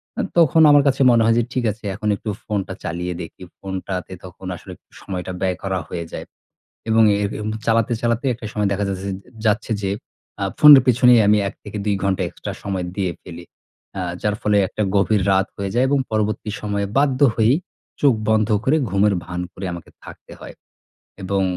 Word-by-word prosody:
অ্যা - - -1
তখন 160 -1 +5
আমার 145 -1 +6
কাছে 135 0 +1
মনে 115 -1 +4
হয় 115 0 +3
যে 120 - +2
ঠিক 130 - -1
আছে 110 - -14
এখন 110 - -5
একটু 110 - -6
ফোনটা 100 -3 -3
চালিয়ে 90 +1 -3
দেখি। 85 - -10 0.2
ফোনটাতে 95 -1 -5
তখন 95 +1 -12
আসলে - - -11 0.3
সময়টা 95 -1 -5
ব্যয় 95 -1 0
করা 95 -1 -1
হয়ে 85 -1 -5
যায় - - -6 0.6
এবং 110 0 +4
এ - - 0 0.2
এম 105 - -3 0.2
চালাতে, 115 +1 +2
চালাতে 120 +3 0
একটা 115 -1 -9
সময় 105 -2 0
দেখা 100 +1 -1
যাচ্ছে 95 0 -4
যে - - -3 0.3
যাচ্ছে 110 +1 +1
যে 95 - -1 0.5
আ - - 0 0.2
ফোনের 145 -3 +10
পেছনেই 125 -1 +6
আমি 105 0 +5
১ - - -6
থেকে 105 0 -7
দুই 105 -1 +1
ঘন্টা 95 -1 0
এক্সট্রা - - -7
সময় 95 -2 -3
দিয়ে 95 -3 -1
ফেলি। 85 -1 -10 0.6
আ - - -2 0.2
যার 105 -1 0
ফলে 105 -1 +2
একটা 110 - -5
গভীর 100 0 +2
রাত 95 0 +2
হয়ে 100 -1 -3
যায় 125 +2 +3
এবং 145 - +3
পরবর্তী 110 0 -1
সময়ে 100 -1 -2
বাধ্য 135 -2 +2 0.2
হয়েই 115 +3 +3 0.5
চোখ 140 -4 +5 0.2
বন্ধ 110 -1 +3 0.2
করে 140 - +2
ঘুমের 100 +2 +2
ভান 90 0 -5
করে 95 - -7
আমাকে 85 -2 -9
থাকতে - - -13
হয় - - -10 0.7
এবং 95 +1 0
105 Hz, 190 wpm, -21 LUFS, 95-115 Hz, 0.7 s, ফোনের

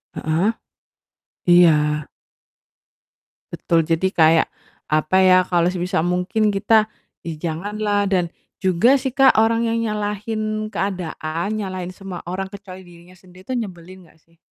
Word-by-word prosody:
Heeh, 165 +8 0 1.0
iya 175 -2 +7 1.8
Betul 165 -1 0
jadi 165 +3 +1
kayak, 160 -2 +4 0.4
apa 155 +4 +2
ya, 185 0 +6
kalau 175 -1 +2
sebisa 180 -2 -2
mungkin 180 +4 0
kita 215 +2 +3 0.4
ya 165 - -5
janganlah 205 +5 -2
dan, 180 -2 +2 0.3
juga 205 +9 +3
sih 265 -1 -4
Kak, 270 -4 +5
orang 230 +1 +2
yang 230 - 0
nyalahin 215 +1 -3
keadaan, 180 +1 -3
nyalahin 185 -2 -5
semua 190 -3 -9
orang 190 +2 -4
kecuali 195 -2 -11
dirinya 175 0 -17
sendiri 185 +1 -18
itu 260 - -4
nyebelin 185 -5 -7
nggak - - -25
sih? 165 +1 -32
185 Hz, 130 wpm, -21 LUFS, 175-210 Hz, 1.8 s, iya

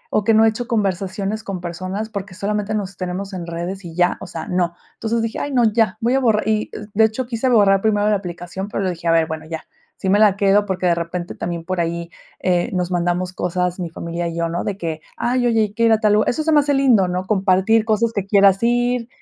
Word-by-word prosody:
o 210 - +3
que 225 - +3
no 220 - +6
he 225 - +6
hecho 235 +2 -5
conversaciones 200 -1 -1
con 195 -4 -5
personas, 185 +5 -4
porque, 195 -2 -6
solamente, 210 +1 -2
nos 195 -3 -4
tenemos 185 +2 -4
en 180 -2 -5
redes 175 +3 -5
y 165 - -9
ya, 175 0 +2
o - - -7
sea, 165 -2 -6
no. 175 -1 0 0.2
Entonces 230 +1 -1
dije: 225 0 -3
"Ay 285 - -3
no, 250 -3 +3
ya 220 -2 +1
voy 240 +3 +2
a - - +3
borrar" 220 -4 +2
y 215 -1 0 0.2
de 220 - +5
hecho 220 +3 0
quise 240 +2 -1
borrar 200 -4 +4
primero 210 -1 +2
la 210 - +3
aplicación, 180 0 -5
pero, 205 - -3
luego 185 -2 0
dije 170 0 -7
a 165 - +4
ver 165 -1 +3
bueno 160 -1 -5
ya, 160 0 -6 0.3
sí 190 - -2
me 205 - +4
la 210 -3 +5
quedo, 200 +1 +3
porque, 185 -1 -2
de 175 - +4
repente, 170 +1 -4
también 170 -1 -4
por 185 +1 -2
ahí, 170 0 -2 0.3
eh, 180 +2 +1
nos 180 -1 -1
mandamos 175 +1 -1
cosas 180 0 -2
mi 175 -2 -3
familia 170 +1 -4
y 170 - -5
yo, 170 0 0
¿no? 170 - -2
De 200 - -3
que, 160 -4 -4 0.2
ay, 245 0 +1
oye, 225 -2 +3
hay 210 -1 -1
que 230 - -1
ir 230 - +4
a 220 - +2
tal 210 -1 +3
lu 210 +1 +4
eso 310 - 0
se 320 - +1
me 300 - +6
hace 285 0 +1
lindo, 250 -9 +4
¿no?, 180 +1 -2
compartir 195 +2 +3
cosas 225 +1 +1
que 200 -3 -2
quieras 200 -1 +5
ir. 240 0 +1
195 Hz, 255 wpm, -20 LUFS, 180-220 Hz, 0.3 s, no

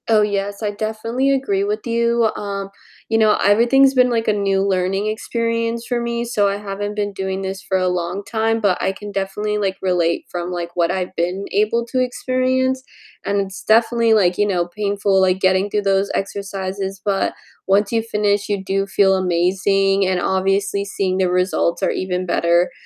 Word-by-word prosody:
Oh, 215 -2 +5
yes, 200 0 -2
I 210 - 0
definitely 220 +5 -2
agree 230 -8 0
with 210 +1 -2
you, 235 -1 +2
um, 200 -1 -4 0.4
you 225 0 +2
know, 215 -1 +4
everything's 240 +6 +4
been 250 -1 +4
like 230 -2 -1
a 215 - +3
new 195 -1 +1
learning 190 +1 0
experience 230 +1 -2
for 245 -1 -1
me, 235 0 -2
so, 210 -4 +1
I 200 0 -1
haven't 205 0 -5
been 205 -1 -2
doing 190 0 -3
this 190 0 -4
for 190 - -1
a 185 0 +1
long 180 +2 -2
time, 225 0 0
but 200 -4 +1
I 190 - 0
can 205 +1 -9
definitely, 200 +2 -2
like, 195 -2 -1
relate 175 -3 0
from, 175 0 -4
like, 170 -1 -4
what 170 -1 +2
I've 185 0 -3
been 180 +4 -2
able 215 +4 +1
to 255 - 0
experience, 255 +1 0 0.4
and 200 0 0
it's 195 0 -7
definitely, 230 +1 +3
like, 180 -4 +2
you 205 - +3
know, 175 -3 0
painful, 200 0 0
like, 190 0 +2
getting 190 +1 +2
through 210 0 -1
those 195 0 +1
exercises, 195 0 -4
but 200 -2 0 0.3
once 200 +1 +2
you 230 -1 +1
finish, 210 -2 0
you 200 -2 -1
do 195 +1 -1
feel 195 -1 +3
amazing, 195 +2 +1
and 185 -1 +1
obviously 195 +2 0
seeing 190 -2 -2
the 185 -1 +2
results 180 0 0
are - - +2
even 185 -1 -2
better, 170 0 +2
200 Hz, 185 wpm, -20 LUFS, 190-220 Hz, 0.4 s, Oh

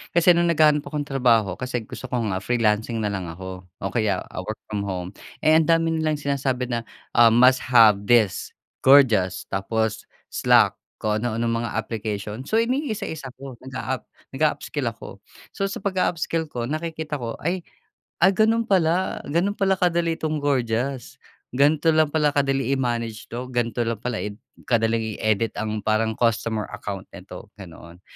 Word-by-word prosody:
kasi 175 +1 +6
nung 170 0 +3
naghahanap 150 -2 +3
akong 150 -1 -3
trabaho, 120 -9 +2
kasi 125 -2 -3
gusto 130 - -8
ko 120 -1 -1
nga 95 -3 -1
freelancing 110 0 0
nalang 95 -4 -2
ako, 95 +2 -8 0.2
o 95 - -2
kaya, 105 -6 0
ah, - - -6
work 110 - -3 0.2
from 105 - -1
home. 90 -2 -4 0.3
Eh, 155 - +5
ang 160 - +1
dami 165 0 +3
nalang 155 -1 +1
sinasabi 135 -3 -2
na, 115 -1 -3 0.3
um, 115 -1 +7
"Must 125 +2 +6
have 110 -5 +5
this 115 -6 +2 0.2
Gorgias", 120 -10 +4
tapos 110 +2 -2 0.2
slack - - +3 0.2
kung 105 0 -1
ano-anong 115 0 -1
mga - - -5
application. 110 +1 -4
So, - - -1
inisa-isa 220 - -3
ko 135 -3 -10
nag-aap 130 -2 -5 0.2
nag-a-upskill - - -1
ako. - - -7 0.3
So, 195 - -2
sa 195 - -6
pag-a-upskill 170 -4 -1
ko 120 -5 -5
nakikita 155 +1 -4
ko 115 -2 -4
ay, 180 +4 0 0.7
"Ay 190 - +6
ganun 220 +3 +2
pala, 185 -3 +1
ganun 170 +7 +1
pala 195 -2 +1
kadali 170 -2 +1
itong 155 -1 -2
Gorgias. 130 -2 -1 0.3
Gan'to 150 +4 +3
lang 155 -1 +3
pala 150 -1 +1
kadali 135 -2 +1
i-manage 120 -4 -3
'to. 125 +2 -5
Gan'to 120 -2 -1
lang 115 -1 -3
pala 125 -2 -2
i 105 - -4 0.3
kadaling 115 -2 +1
i-edit 110 +1 0
ang 110 0 -3
parang 110 0 +1
customer 110 -2 0
account 100 -2 -6
nito," 90 -1 -10
ganoon. 85 -2 -13
120 Hz, 160 wpm, -23 LUFS, 110-155 Hz, 0.7 s, um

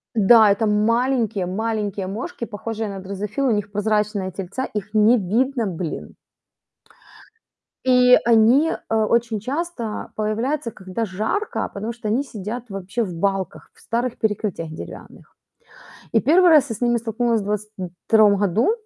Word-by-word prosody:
Да, 220 0 +6
это 215 +2 +1
маленькие-маленькие 215 -3 0
мошки, 220 +4 -5
похожие 225 +1 -5
на 195 -1 -6
дрозофил, 205 +7 -3
у - - +3
них 205 -2 -1
прозрачные 210 -2 0
тельца, 195 +8 -4
их 210 0 -6
не 215 +3 +5
видно, 235 +5 0
блин. 175 -4 -5 1.7
И 250 -1 +6
они, 235 +7 +5
э, 225 - -4
очень 220 0 +1
часто 265 - -4
появляются, 230 +5 -1
когда 190 +3 -4
жарко, 220 - -2
потому 215 +3 -4
что 225 -2 -7
они 230 +6 +1
сидят 235 0 -7
вообще 195 +4 -3
в 185 -5 -5
балках, 195 +1 -2
в - - -25
старых 235 +2 -2
перекрытиях 210 -6 -2
деревянных. 160 - -11 0.8
И 225 - +4
1 345 +9 +5
раз 295 -4 +5
я 225 - -3
с 215 - -13
ними 240 0 +2
столкнулась 230 0 0
в - - -6
22 210 0 +1
году, 205 - +2
220 Hz, 140 wpm, -22 LUFS, 200-240 Hz, 1.7 s, Да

